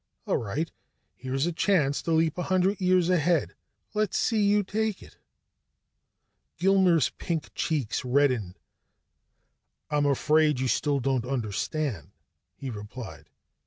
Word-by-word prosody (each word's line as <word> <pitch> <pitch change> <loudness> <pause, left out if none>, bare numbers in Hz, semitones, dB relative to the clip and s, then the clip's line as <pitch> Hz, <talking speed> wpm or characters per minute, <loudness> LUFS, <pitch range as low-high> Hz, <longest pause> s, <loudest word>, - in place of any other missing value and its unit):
All - - +1
right, 145 +10 -3 0.4
here's 135 +3 -2
a 175 - 0
chance 160 -5 +1
to 165 - -3
leap 160 -1 +2
a 180 - -3
hundred 185 +1 +2
years 185 -1 +3
ahead. 175 -3 +2 0.4
Let's 215 -2 0
see 225 -3 +1
you 205 0 +3
take 215 +1 -2
it." - - -17 1.4
Gilmer's 185 -5 +3
pink 160 -5 -4
cheeks 140 -7 -1
reddened. 125 -8 +1 1.3
"I'm 145 -1 +2
afraid 150 +1 +3
you 130 - 0
still 145 +2 +1
don't 130 -1 0
understand," 125 - -3 0.5
he 135 -2 -6
replied. 110 +3 -9
155 Hz, 125 wpm, -27 LUFS, 130-180 Hz, 1.4 s, years